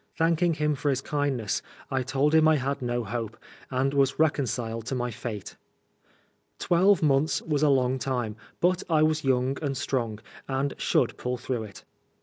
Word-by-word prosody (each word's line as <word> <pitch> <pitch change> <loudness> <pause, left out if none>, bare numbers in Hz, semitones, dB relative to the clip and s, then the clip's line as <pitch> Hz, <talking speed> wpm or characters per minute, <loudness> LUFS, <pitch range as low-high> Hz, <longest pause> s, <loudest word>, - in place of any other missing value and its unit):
Thanking 165 +1 +2
him 150 0 +1
for 145 +1 -1
his 135 -2 +1
kindness, 135 -7 -1 0.3
I 130 -1 +1
told 140 +3 +1
him 160 0 +6
I 160 - +5
had 140 0 -2
no 120 -1 -1
hope, 115 0 -4 0.3
and 135 +1 0
was 135 -1 +2
reconciled 120 -7 0
to 135 - -2
my 125 -1 -2
fate. 110 -2 -6 1.0
Twelve 185 +1 +3
months 145 +1 +3
was 150 -3 0
a 150 - +4
long 130 -1 +2
time, 120 -4 -2 0.3
but 180 +1 +3
I 155 -2 +4
was 155 0 +1
young 130 0 +1
and 140 -3 -2
strong, 115 -6 -1 0.3
and 135 +1 -1
should - - +1
pull 125 0 -2
through 120 -2 -3
it. 100 -2 -12
135 Hz, 170 wpm, -27 LUFS, 125-150 Hz, 1.0 s, him